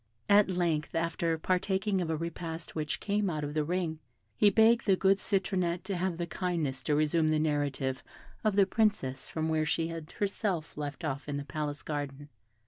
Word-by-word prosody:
At 205 Hz, -1 st, +6 dB
length, 170 Hz, -4 st, 0 dB
after 165 Hz, 0 st, 0 dB
partaking 190 Hz, +3 st, 0 dB
of 170 Hz, -, -2 dB
a 160 Hz, -, 0 dB
repast 165 Hz, 0 st, -5 dB
which 150 Hz, -2 st, -2 dB
came 205 Hz, -1 st, 0 dB
out 155 Hz, -3 st, -2 dB
of 145 Hz, 0 st, -3 dB
the 155 Hz, 0 st, +1 dB
ring, 165 Hz, -1 st, -1 dB, 0.4 s
he 205 Hz, -, +5 dB
begged 225 Hz, +3 st, +4 dB
the 195 Hz, -, +6 dB
good 195 Hz, +1 st, +3 dB
Citronette 185 Hz, -4 st, 0 dB
to 195 Hz, 0 st, -3 dB
have 180 Hz, -1 st, -1 dB
the 170 Hz, -, -1 dB
kindness 165 Hz, -7 st, -2 dB
to 150 Hz, -, +2 dB
resume 155 Hz, +1 st, +2 dB
the 155 Hz, -, +3 dB
narrative 145 Hz, -3 st, 0 dB, 0.4 s
of 215 Hz, -3 st, +2 dB
the 200 Hz, -1 st, +6 dB
Princess 200 Hz, -, 0 dB
from 160 Hz, 0 st, -2 dB
where 160 Hz, -1 st, +1 dB
she 165 Hz, +1 st, 0 dB
had 165 Hz, -2 st, -7 dB
herself 195 Hz, -5 st, -2 dB
left 145 Hz, +2 st, -5 dB
off 145 Hz, 0 st, -3 dB
in 145 Hz, -, -2 dB
the 145 Hz, -, -5 dB
palace 145 Hz, +1 st, -4 dB
garden. 145 Hz, -1 st, -4 dB
165 Hz, 190 wpm, -30 LUFS, 150-190 Hz, 0.4 s, At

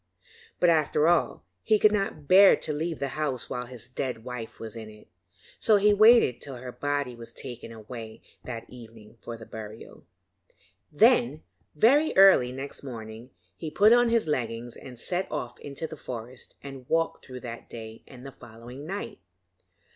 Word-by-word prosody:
But, 175 Hz, -1 st, +5 dB
after 155 Hz, -1 st, +2 dB
all, 170 Hz, -1 st, +1 dB, 0.2 s
he 215 Hz, -, +3 dB
could 210 Hz, 0 st, +5 dB
not 195 Hz, -8 st, -2 dB
bear 195 Hz, +3 st, +8 dB
to 155 Hz, -, -4 dB
leave 160 Hz, +2 st, -3 dB
the 140 Hz, -, -3 dB
house 145 Hz, -4 st, -3 dB
while 125 Hz, -1 st, -4 dB
his 120 Hz, -2 st, -8 dB
dead 125 Hz, -3 st, -4 dB
wife 125 Hz, -2 st, -7 dB
was 110 Hz, -1 st, -7 dB
in 110 Hz, -1 st, -8 dB
it, 105 Hz, 0 st, -16 dB, 0.5 s
so 215 Hz, -, +4 dB
he 205 Hz, +1 st, +5 dB
waited 215 Hz, -, +6 dB
till 135 Hz, -2 st, -6 dB
her 125 Hz, 0 st, -8 dB
body 145 Hz, -1 st, -2 dB
was 115 Hz, -1 st, -10 dB
taken 120 Hz, -3 st, -8 dB
away 110 Hz, 0 st, -9 dB, 0.2 s
that 115 Hz, -2 st, -6 dB
evening 115 Hz, -2 st, -14 dB
for 115 Hz, -1 st, -7 dB
burial. 110 Hz, 0 st, -10 dB, 0.9 s
Then, 155 Hz, -, +3 dB, 0.3 s
very 275 Hz, -, +4 dB
early 190 Hz, -11 st, +7 dB
next 135 Hz, +2 st, -7 dB
morning, 115 Hz, -2 st, -9 dB, 0.3 s
he 160 Hz, -, -6 dB
put 205 Hz, +8 st, +5 dB
on 240 Hz, 0 st, +4 dB
his 230 Hz, -4 st, +2 dB
leggings 120 Hz, -5 st, -3 dB
and 125 Hz, -2 st, -11 dB
set 180 Hz, +9 st, -3 dB
off 120 Hz, -, -5 dB
into 145 Hz, +2 st, -6 dB
the 160 Hz, -, -7 dB
forest 125 Hz, -1 st, -8 dB
and 135 Hz, -2 st, -10 dB
walked 165 Hz, 0 st, 0 dB
through 130 Hz, -1 st, -9 dB
that 115 Hz, -1 st, -8 dB
day 110 Hz, -1 st, -9 dB
and 125 Hz, 0 st, -13 dB
the 135 Hz, -, -8 dB
following 120 Hz, +4 st, -11 dB
night. 195 Hz, +3 st, -5 dB
130 Hz, 170 wpm, -27 LUFS, 115-165 Hz, 0.9 s, bear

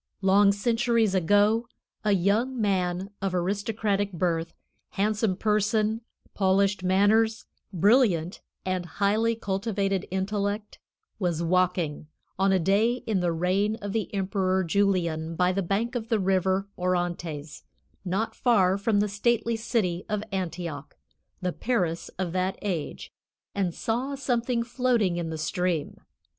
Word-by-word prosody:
Long 200 Hz, +1 st, +5 dB
centuries 230 Hz, 0 st, +1 dB
ago, 205 Hz, +5 st, +3 dB, 0.4 s
a 210 Hz, -1 st, +3 dB
young 215 Hz, +8 st, +1 dB
man 190 Hz, -2 st, 0 dB
of 195 Hz, -2 st, -1 dB
aristocratic 200 Hz, +2 st, -1 dB
birth, 170 Hz, -2 st, -1 dB, 0.4 s
handsome 210 Hz, 0 st, +1 dB
person, 215 Hz, +1 st, +1 dB, 0.3 s
polished 195 Hz, 0 st, +2 dB
manners, 215 Hz, +4 st, +3 dB, 0.3 s
brilliant 190 Hz, -3 st, +3 dB, 0.2 s
and 185 Hz, -1 st, -2 dB
highly 215 Hz, +3 st, +2 dB
cultivated 195 Hz, -2 st, -1 dB
intellect, 205 Hz, +2 st, -2 dB, 0.4 s
was 170 Hz, -4 st, 0 dB
walking, 175 Hz, -4 st, 0 dB, 0.3 s
on 195 Hz, 0 st, +3 dB
a 190 Hz, -, +4 dB
day 210 Hz, +8 st, +2 dB
in 215 Hz, -4 st, 0 dB
the 175 Hz, -1 st, +1 dB
reign 185 Hz, +6 st, +1 dB
of 205 Hz, -3 st, -6 dB
the 225 Hz, -2 st, -2 dB
Emperor 190 Hz, -1 st, 0 dB
Julian, 170 Hz, -3 st, 0 dB
by 180 Hz, +1 st, +2 dB
the 195 Hz, +2 st, -1 dB
bank 200 Hz, +7 st, -1 dB
of 230 Hz, -3 st, -4 dB
the 225 Hz, -3 st, +2 dB
river 190 Hz, 0 st, +1 dB
Orontes, 175 Hz, -4 st, -2 dB, 0.4 s
not 195 Hz, +4 st, -1 dB
far 195 Hz, -6 st, +3 dB
from 205 Hz, 0 st, +2 dB
the 210 Hz, -, +1 dB
stately 230 Hz, +3 st, 0 dB
city 215 Hz, -6 st, -1 dB
of 210 Hz, -1 st, -1 dB
Antioch, 170 Hz, -6 st, -4 dB, 0.5 s
the 180 Hz, -1 st, 0 dB
Paris 180 Hz, -9 st, -1 dB
of 180 Hz, -2 st, -2 dB
that 185 Hz, +1 st, -1 dB
age, 180 Hz, -7 st, -4 dB, 0.4 s
and 190 Hz, -3 st, 0 dB
saw 245 Hz, +10 st, -2 dB
something 245 Hz, -3 st, 0 dB
floating 240 Hz, -7 st, +1 dB
in 170 Hz, -2 st, -3 dB
the 160 Hz, -, -4 dB
stream. 170 Hz, -1 st, -1 dB
195 Hz, 130 wpm, -26 LUFS, 180-215 Hz, 0.5 s, Long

